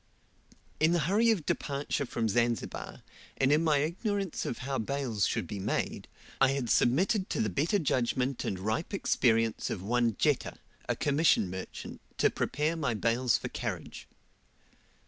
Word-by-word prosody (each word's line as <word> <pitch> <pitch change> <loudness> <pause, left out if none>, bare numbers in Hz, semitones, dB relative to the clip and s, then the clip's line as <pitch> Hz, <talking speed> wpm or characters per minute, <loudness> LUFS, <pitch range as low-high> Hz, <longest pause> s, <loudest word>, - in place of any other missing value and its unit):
In 160 +2 +4
the 175 - +3
hurry 215 +7 +3
of 195 -9 +1
departure 140 -1 -2
from 115 -2 -1
Zanzibar, 120 +2 -1 0.3
and 135 +1 +3
in 155 +2 +4
my 155 -3 +3
ignorance 190 +5 -2
of 120 - -3
how 135 -1 -1
bales 120 -3 -1
should - - -1
be 100 +4 -6
made, 95 - -2 0.3
I 135 0 +5
had 130 -4 -1
submitted 190 - +2
to - - -2
the 105 - 0
better 155 - +1
judgment 130 -4 0
and 95 - -2
ripe 110 - -2
experience 115 - +1
of 95 - -4
one 115 +1 +1
Jetta, - - +1 0.3
a - - +2
commission 145 - +2
merchant, 95 0 -7 0.2
to - - +3
prepare 150 +4 -1
my 140 -8 -1
bales 115 +3 +2
for - - -5
carriage. - - -5
135 Hz, 155 wpm, -30 LUFS, 115-160 Hz, 0.3 s, I